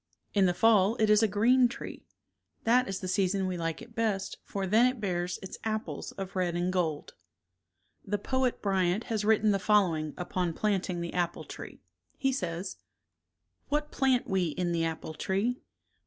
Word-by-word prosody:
In 195 -2 +4
the 175 - +1
fall 210 +1 +4
it 215 -2 +3
is 210 +1 +6
a 220 - +4
green 240 +5 +4
tree. 240 - -8 0.6
That 250 +3 +4
is 195 -1 -4
the 185 - -4
season 190 0 +1
we 185 -1 -2
like 165 -2 -3
it 230 - -14
best 215 -4 -1
for 195 -1 -3
then 220 +6 +5
it 255 -1 -2
bears 180 -3 -1
its 190 - -8
apples 220 -1 -3
of 195 0 -7
red 180 -2 0
and 175 +1 0
gold. 160 -5 -1 0.9
The 205 +1 -1
poet 260 +4 -1
Bryant 190 0 +1
has 215 -1 0
written 215 0 +4
the 200 - +1
following 180 -7 +2
upon 180 -1 -2
planting 190 -4 0
the 170 - -4
apple 175 -1 -1
tree. - - -10 0.3
He 270 0 +1
says: 180 -6 -3 0.9
What 300 +1 -1
plant 260 -2 +2
we 190 -2 +1
in 175 +2 -1
the 165 -1 +1
apple 160 -1 -4
tree? 200 +10 -1
195 Hz, 175 wpm, -29 LUFS, 180-220 Hz, 0.9 s, is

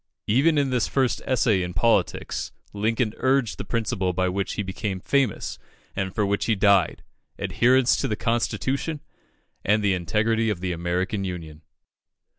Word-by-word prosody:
Even 140 +9 +3
in 140 -2 +1
this 125 -3 +1
first 130 -3 0
essay 120 -7 +2
in 90 0 -4
politics, 115 +3 0 0.2
Lincoln 110 +2 0
urged 130 -3 +1
the - - -3
principle 110 -5 -1
by 95 +1 +1
which 95 +1 -2
he 105 - -2
became 95 0 -4
famous, 135 +1 0 0.4
and 95 -1 -3
for 105 - +1
which 100 +1 0
he 115 - +2
died 100 0 +3 0.3
adherence 120 +7 +3
to - - -1
the 105 - -1
constitution 130 +6 -1 0.6
and 105 +1 +2
the 100 -1 +3
integrity 110 +6 +1
of 105 -5 -2
the 90 0 -2
American 90 +4 -1
Union. 80 -5 -6
105 Hz, 155 wpm, -24 LUFS, 95-120 Hz, 0.6 s, Even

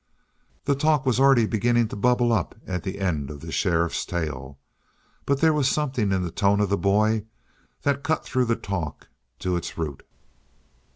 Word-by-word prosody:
The 140 - +3
talk 150 0 +2
was 125 -1 +2
already 135 -4 +5
beginning 115 +1 +1
to - - -6
bubble 120 +2 +2
up 95 -7 -1
at 90 -1 -3
the 95 +3 -5
end 80 -8 -1
of 75 -1 -8
the 80 0 -7
sheriff's 85 -2 +1
tale. 70 -6 -4 0.7
But 140 0 +1
there 160 -1 +5
was 145 -3 +2
something 130 -10 0
in 95 -1 +1
the 85 - -3
tone 100 +3 +2
of 105 -2 +1
the 100 - +2
boy 105 +2 +2 0.6
that 140 -1 +1
cut 160 +2 -1
through 130 -1 +1
the 115 -1 +1
talk 95 -7 -5 0.3
to 90 -1 0
its 85 0 -4
root. 75 -4 -4
105 Hz, 180 wpm, -25 LUFS, 85-130 Hz, 0.7 s, already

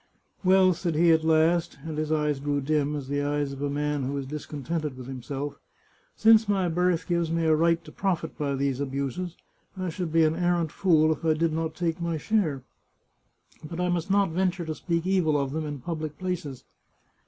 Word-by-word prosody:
" - - -39
Well," 185 0 +5
said 170 -1 -2
he 170 +2 +5
at 160 -1 +3
last, 160 +1 +2
and 160 -1 -4
his 155 0 -2
eyes 150 -2 +1
grew 145 0 -1
dim 150 +1 0
as 140 -3 -5
the 145 +1 -1
eyes 145 -1 -1
of 135 - -8
a 145 - 0
man 145 0 -1
who 135 +2 -2
is 140 - -3
discontented 150 0 -4
with 130 - -8
himself, 135 +2 -5 0.3
" - - -37
since 220 -1 +5
my 195 -3 +2
birth 175 0 +1
gives 170 -2 0
me 165 0 0
a 160 -1 +4
right 165 +1 +2
to 155 - -11
profit 175 -3 -2
by 140 -2 -1
these 135 -1 -1
abuses, 140 +6 -3 0.4
I 185 -1 -2
should 170 0 -4
be 165 0 +4
an 155 0 +2
arrant 175 -2 +1
fool 160 -4 +3
if 155 - -3
I 160 -1 +3
did 165 0 +1
not 160 0 -2
take 170 -1 -2
my 170 -1 -1
share; 155 - 0 1.0
but 165 +3 -6
I 180 0 +1
must 175 +1 -1
not 200 -2 +3
venture 180 0 0
to 160 - -3
speak 170 +1 -2
evil 175 -6 +2
of 140 -1 -2
them 155 +1 -3
in 145 -1 -4
public 155 0 -4
places." 180 -8 -4
160 Hz, 210 wpm, -27 LUFS, 145-175 Hz, 1.0 s, Well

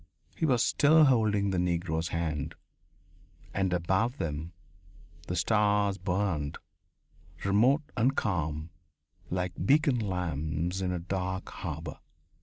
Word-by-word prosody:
He 160 - 0
was 125 -5 +3
still 155 +2 +5
holding 105 -6 +3
the 90 - 0
Negro's 85 -2 0
hand. 80 -4 -2 1.0
And 95 -1 0
above 95 - +1
them 80 +1 -3 0.8
the 90 - -2
stars 105 +1 +2
burned, 90 -5 -1 0.9
remote 120 +10 +4
and 130 +3 +2
calm, 80 -5 -1 0.6
like 90 -1 -2
beacon 140 +2 +3
lamps 90 -2 -2
in 90 -1 -1
a 90 - -1
dark 95 +2 -3
harbour.... 80 -4 -6
95 Hz, 110 wpm, -29 LUFS, 85-105 Hz, 1.0 s, still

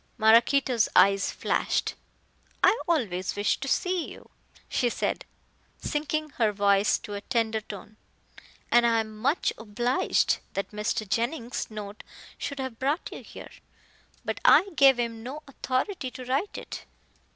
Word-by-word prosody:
Maraquito's 235 +2 +4
eyes 195 0 +5
flashed. - - 0 0.7
"I - - +6
always 205 - 0
wish 205 0 +1
to 275 - -5
see 360 +4 0
you," - - -13 0.4
she 245 - +1
said, - - -2 0.5
sinking 310 0 -2
her 220 -2 +4
voice 200 0 +3
to 205 - -9
a 200 - -4
tender 225 -2 0
tone, 210 0 -10 0.7
"and 240 0 +6
I 230 -1 +3
am 215 -1 -8
much 270 +10 0
obliged 240 +4 +1
that 195 - -3
Mr. 210 +1 -2
Jennings' 235 +3 -2
note 210 -1 -7 0.4
should 280 - -4
have 260 -4 -5
brought 285 +6 -1
you - - -8
here. - - -11 0.7
But - - -2
I 395 - +6
gave 270 -3 +6
him 230 -1 -2
no 275 +6 -7
authority 265 +3 -2
to 255 0 -9
write 275 +11 -1
it." - - -8
235 Hz, 140 wpm, -27 LUFS, 215-275 Hz, 0.7 s, I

